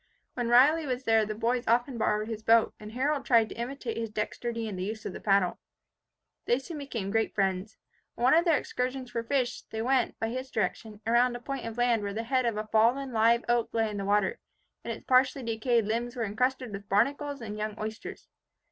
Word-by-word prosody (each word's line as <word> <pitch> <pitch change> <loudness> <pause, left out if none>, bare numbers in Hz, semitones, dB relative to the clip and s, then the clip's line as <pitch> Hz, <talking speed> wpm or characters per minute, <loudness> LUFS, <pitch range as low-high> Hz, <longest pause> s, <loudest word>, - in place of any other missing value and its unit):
While 245 -2 -2
Riley 285 +6 +5
was 255 0 -2
there 225 -3 +3
the 215 - -4
boys 240 +2 -1
often 240 +2 +1
borrowed 215 0 +1
his 220 -1 -5
boat, 225 +1 +4
and 215 +1 -10
Harold 280 +3 0
tried 230 -3 +4
to - - -8
imitate 240 0 -4
his 225 -1 -3
dexterity 230 +2 -3
in 210 - -5
the 185 - -4
use 215 +2 -5
of 195 - -4
the - - -7
paddle. 195 -3 +2 0.9
They 240 - +3
soon 295 +4 -7
became 230 -9 -4
great 225 +1 0
friends. 195 +1 -1 0.4
On - - -4
one 255 - +6
of 330 +2 +5
their 330 -4 +4
excursions 255 0 -3
for 230 - -2
fish, 250 +1 -1
they 220 0 -3
went, 255 -1 +1
by 225 - -1
his 255 +2 -5
direction, 220 -1 -3
around 240 +2 +3
a - - -5
point 265 -1 -5
of 230 0 -7
land 240 -2 +2
where 200 0 -4
the 225 - -2
head 255 +1 +1
of 225 -2 -1
a 215 - -2
fallen 235 +5 +2
live 230 +2 +3
oak 240 -1 +2
lay 225 -1 +1
in 205 - -5
the 200 - -3
water, 210 - +1 0.4
and - - -4
its - - -7
partially 260 +1 +3
decayed 230 0 +1
limbs 235 +3 -2
were 235 -2 -1
encrusted 250 +3 -1
with 200 0 -8
barnacles 280 +7 +1
and 215 -2 -6
young 215 0 -4
oysters. 220 +1 -6
230 Hz, 220 wpm, -29 LUFS, 215-255 Hz, 0.9 s, one